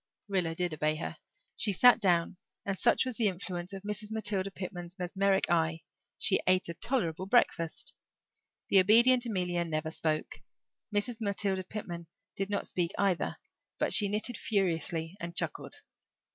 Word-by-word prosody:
Rilla 180 -5 -1
did 175 -1 -2
obey 155 0 0
her. 155 - -6 0.4
She 210 - +3
sat 245 +6 +6
down 175 -3 +1 0.3
and, 195 - -1
such 235 +6 +2
was 255 -3 -5
the 225 - +2
influence 180 -1 -4
of 195 -1 -8
Mrs. 210 +1 -5
Matilda 205 -3 +1
Pitman's 180 -1 -7
mesmeric 190 +2 +1
eye, 165 -1 +1 0.4
she 190 - +3
ate 185 0 +3
a - - -3
tolerable 185 -3 -2
breakfast. 170 -7 +1 0.8
The 195 - +6
obedient 235 +6 +5
Amelia 180 -5 -1
never 160 -1 -3
spoke; 155 -1 -2 0.5
Mrs. 210 +3 -1
Matilda 200 -2 0
Pitman 175 -4 -7 0.3
did 195 0 -3
not 205 - -2
speak 175 -2 -2
either; 195 -4 0 0.4
but - - +1
she 205 -2 +7
knitted 215 +3 -2
furiously 175 -3 -1
and 170 -2 -6
chuckled. - - -2
190 Hz, 150 wpm, -30 LUFS, 170-205 Hz, 0.8 s, she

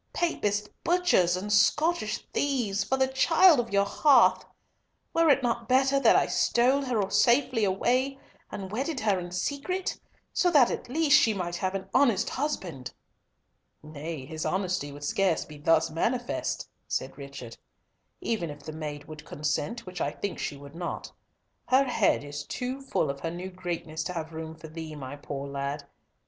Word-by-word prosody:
Papist 210 -11 0 0.2
butchers 335 - +3
and 205 +3 -2
Scottish 295 +3 +2
thieves, 240 -9 0
for 265 - 0
the 265 0 +3
child 315 +4 +5
of 235 -2 -2
your 200 0 +3
hearth! 260 +4 +4 0.7
Were 330 -1 +4
it 275 -2 +4
not 235 -1 -1
better 265 +2 +4
that - - +5
I - - +4
stole 255 +4 +2
her 220 -6 0
safely 245 -2 +3
away 250 +8 +1 0.3
and 190 -1 -6
wedded 270 +6 -2
her 205 -4 +2
in 175 0 -6
secret, 285 - -3 0.3
so 360 - +3
that 285 -8 +5
at - - -5
least 300 +1 +5
she 220 -4 +2
might 175 -2 -3
have 185 +1 -2
an 190 0 -4
honest 235 -5 +3
husband?" 180 - -4 0.9
"Nay, 155 -1 -6
his 155 +2 -5
honesty 185 -5 -1
would 145 +1 -10
scarce 180 +3 +1
be 150 -1 -12
thus 160 +1 +3
manifest," 240 +9 -2 0.2
said - - -3
Richard, 140 -4 -9 0.6
"even 210 -8 -1
if 145 -1 -9
the 155 - -7
maid 150 -2 -6
would 155 -1 -9
consent, 150 +11 -3
which 185 -1 -7
I - - +1
think 200 +6 -5
she 145 - -3
would 140 0 -12
not. 170 +1 -5 0.6
Her 260 +2 +5
head 235 - +2
is 145 0 -6
too 255 +2 -4
full 210 - 0
of 140 - -9
her 165 - -3
new 180 +3 -6
greatness 170 -3 -4
to 180 - -3
have 165 -1 -5
room 160 0 -6
for 160 0 -11
thee, 160 -1 -7
my 135 -1 -7
poor 140 -1 -6
lad. 140 +1 -4
195 Hz, 170 wpm, -28 LUFS, 155-255 Hz, 0.9 s, child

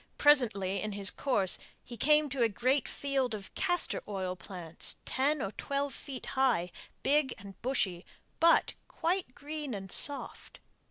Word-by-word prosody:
Presently 220 -10 +3
in 215 -1 -3
his 200 0 +4
course 200 -9 0 0.2
he 240 - -9
came 300 +6 +4
to 270 -1 -2
a 230 - +4
great 255 +6 +1
field 270 -5 -1
of 200 -2 -9
castor 355 -1 +1
oil 190 -3 -3
plants, 175 -2 -3
ten 280 +2 +1
or 195 - -3
twelve 280 +4 -3
feet 270 -3 -7
high, 245 -10 +2 0.3
big 285 -2 +2
and 200 -2 -12
bushy, 195 -9 0 0.4
but 335 +1 +4
quite 345 -6 -2
green 295 -4 -5
and 190 -2 -7
soft. 285 -1 +1
250 Hz, 150 wpm, -31 LUFS, 195-285 Hz, 0.4 s, his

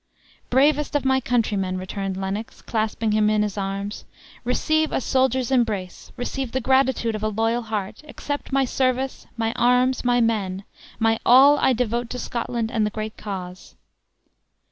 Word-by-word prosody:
"Bravest 290 +3 +2
of 285 -2 +1
my 265 0 +3
countrymen!" 210 -7 0
returned 190 +1 -4
Lennox, 195 +3 -5
clasping 220 0 -1
him 210 0 +3
in 215 0 +2
his 210 -2 -3
arms, 200 +1 -4 0.4
"receive 310 +5 +1
a - - +1
soldier's 260 -1 +1
embrace, 215 -8 -1
receive 250 0 -4
the 260 - +1
gratitude 265 -2 +2
of 215 - -4
a 215 - 0
loyal 225 +3 0
heart! 215 -1 -4
accept 285 -1 -5
my 270 0 +2
service, 260 +1 -1
my 225 0 0
arms, 250 +1 +2
my 245 0 +3
men: 205 -5 0 0.3
my 225 0 +2
all 275 +4 +7
I 265 - +3
devote 240 0 -1
to 250 - -5
Scotland 235 -2 -3
and 225 -3 +1
the 210 - +1
great 215 +1 -5
cause." 185 -3 -7
230 Hz, 160 wpm, -23 LUFS, 210-260 Hz, 0.4 s, all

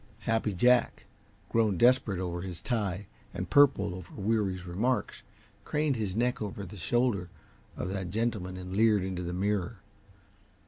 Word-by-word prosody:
Happy 115 -1 0
Jack, 120 +7 +3 0.4
grown 110 -5 +2
desperate 120 -3 +4
over 90 -1 -3
his 90 -2 -7
tie 105 -5 -1 0.3
and 90 +1 -4
purple 130 -10 +5
over 90 -1 -9
Weary's 100 -3 0
remarks, 105 +6 -1 0.4
craned 150 -2 0
his 105 -5 -2
neck 125 +1 0
over 100 -1 -4
the 95 - -10
shoulder 100 -1 0 0.5
of - - -3
that 95 -2 -3
gentleman 100 -3 -2
and 90 0 -6
leered 105 -2 +4
into 95 -1 -3
the 85 -1 -4
mirror. 100 +3 -1
100 Hz, 145 wpm, -29 LUFS, 90-115 Hz, 0.5 s, purple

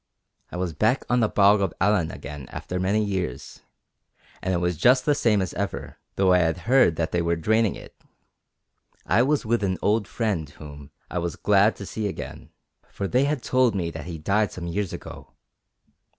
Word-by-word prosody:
I - - -5
was 90 -2 -2
back 110 - +1
on 125 - +3
the 110 -3 +2
Bog 100 0 +4
of 95 -4 -1
Allen 95 -5 +2
again 70 -3 -8
after 90 - -5
many 100 +4 +1
years, 95 -10 -4 0.8
and 95 - -2
it 90 - +1
was 90 0 0
just 125 - +4
the 150 - +4
same 110 -8 +2
as 95 - -5
ever, 100 0 -5 0.2
though 95 -1 +3
I 90 - +5
had 80 +1 0
heard 125 -9 +4
that 80 0 -2
they 85 - +1
were 85 0 +1
draining 110 +5 +1
it. - - -12 1.1
I 105 +5 +3
was 140 +1 +1
with 115 -1 +1
an 95 -1 0
old 105 -1 +1
friend 100 -12 -2
whom 75 -1 -11 0.2
I 90 - -1
was 85 -1 -3
glad 105 +1 +3
to 100 - -8
see 110 +2 -3
again, 100 - -7 0.4
for 100 - -4
they 125 +6 +2
had 145 -3 -1
told 130 -4 +2
me 85 -3 -2
that 80 -2 -8
he 85 -2 -5
died 100 +7 +1
some 90 - -7
years 95 +3 -2
ago. - - -9
95 Hz, 195 wpm, -24 LUFS, 85-110 Hz, 1.1 s, I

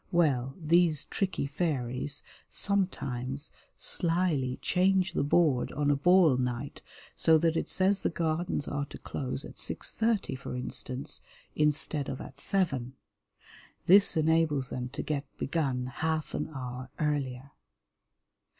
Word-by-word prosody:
Well, 135 -6 +2
these 165 -1 +3
tricky 190 -7 -1
fairies 140 -2 -1 0.3
sometimes 145 -9 -1 0.3
slyly 165 -7 +1
change 185 0 +2
the - - +1
board 145 -3 +3
on 145 0 +1
a - - +3
ball 165 -1 +5
night, 125 +2 -3 0.3
so 160 -1 +5
that 165 +1 +2
it - - -1
says 190 +1 +1
the - - +1
Gardens 160 -2 -1
are 145 0 -2
to - - -9
close 130 +1 -4
at - - -11
six - - -3
thirty 220 -2 +1
for 130 -1 -6
instance, 125 +1 -4 0.3
instead 150 -1 +1
of 130 - -4
at 135 - -10
seven. 140 -10 0 0.9
This 195 -1 +6
enables 155 -4 +2
them 125 0 -4
to 140 - -5
get 145 -2 -2
begun 135 -5 -1
half 155 +4 -2
an - - -2
hour 130 -2 -6
earlier. 140 -3 -2
150 Hz, 130 wpm, -30 LUFS, 130-170 Hz, 0.9 s, This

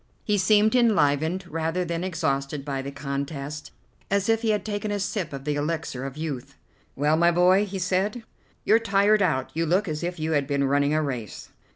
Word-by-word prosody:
He 205 -1 +1
seemed 210 +3 +4
enlivened 180 - +2
rather 165 +2 -2
than 170 0 -3
exhausted 150 -5 -2
by 135 -2 -2
the 135 - -5
contest, 140 +1 -5 0.4
as 200 +1 +1
if 225 0 +3
he 225 - 0
had 210 -1 0
taken 210 0 -3
a 205 0 -1
sip 195 -1 -2
of 135 -1 -7
the 150 +1 -1
elixir 145 -3 -3
of 135 +1 -7
youth. 140 -4 -5 0.4
"Well, 150 +3 +2
my 170 +1 +5
boy," 180 +4 +4
he 195 0 -5
said, 195 +5 -1 0.4
"you're 225 - +5
tired 205 -1 +3
out. 160 -9 0
You 165 +1 -1
look 185 +5 +2
as 155 -2 -3
if 175 0 -4
you 155 +1 -1
had 145 -3 +1
been 140 -1 0
running 140 +2 +2
a 155 - +1
race." 125 -7 -5
165 Hz, 200 wpm, -25 LUFS, 140-195 Hz, 0.4 s, my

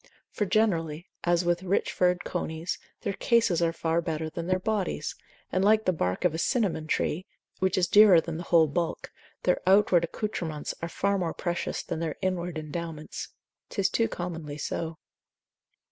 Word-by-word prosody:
For 210 - -1
generally, 170 -6 +1 0.2
as 175 0 +2
with 175 0 +1
rich 190 +1 0
furred 180 0 +2
conies, 160 -1 -3 0.2
their 200 - -2
cases 225 -6 +2
are 165 -1 +3
far 165 0 0
better 160 -1 -3
than 170 +1 -5
their 185 0 +2
bodies, 190 -5 -2 0.4
and 185 - +1
like 215 +2 +4
the 185 - +3
bark 90 - -1
of 175 - +3
a 160 - -3
cinnamon, 185 - 0
tree, 170 +3 -1 0.3
which 190 0 +1
is 180 -2 +3
dearer 205 -2 +8
than 165 0 -4
the 175 - -6
whole 165 -2 +6
bulk, 165 +3 -2 0.3
their 180 - +2
outward 190 -3 +5
accoutrements 170 -5 -3
are 170 - -3
far 200 +3 0
more 170 -3 -2
precious 175 -2 -2
than - - -4
their 165 -2 -2
inward 180 -3 -2
endowments. 155 0 -5 0.4
'Tis 195 -1 0
too 230 +3 +2
commonly 165 -4 -5
so. 160 +2 -3
175 Hz, 170 wpm, -28 LUFS, 160-190 Hz, 0.4 s, dearer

